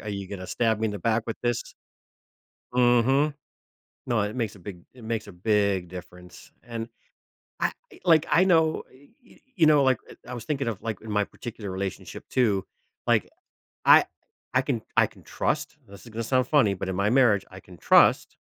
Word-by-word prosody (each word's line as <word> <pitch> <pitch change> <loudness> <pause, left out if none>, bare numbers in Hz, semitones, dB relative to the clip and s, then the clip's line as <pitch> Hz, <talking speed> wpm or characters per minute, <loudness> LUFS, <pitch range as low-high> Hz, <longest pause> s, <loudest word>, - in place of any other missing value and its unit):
A - - -13
are 105 - -7
you 100 -2 -5
gonna 95 -2 -7
stab 110 0 0
me 110 - +1
in - - -2
the 105 - -5
back 110 +3 0
with 115 - -4
this?" 120 -1 0 1.1
Mhm. 125 +4 +3 0.7
No, 120 -2 +1
it 105 +1 -3
makes 115 -5 -2
a - - -14
big 90 -1 -9
it 125 - -14
makes 110 -1 -3
a - - -9
big 100 -1 +1
difference, 90 0 -12
and 115 -1 -6 0.7
I - - +1 0.3
like, 165 -4 +5
I 175 - +5
know 160 -4 +3
y 135 +2 -20 0.2
y - - -20 0.2
you 170 -5 +4
know, 150 -2 +5
like, 130 -2 +3 0.3
I 125 - -6
was 120 - -6
thinking 140 -2 -2
of, 110 -5 -3
like, 110 -4 -4
in 110 - -10
my 105 0 +2
particular 105 -1 -8
relationship 95 0 -6
too, 105 -7 +1 0.4
like - - +2 0.6
I - - +7 0.5
I - - +4
can - - -2 0.2
I - - +5
can - - -18
trust - - -2
this 100 0 -13
is - - -11
gonna 115 +1 -4
sound 130 +2 +1
funny, 135 -10 +4
but 95 0 -5
in 95 - -2
my 100 +2 +1
marriage, 120 -6 +4
I 95 - -11
can 90 -1 -15
trust - - +4
110 Hz, 200 wpm, -26 LUFS, 100-125 Hz, 1.1 s, I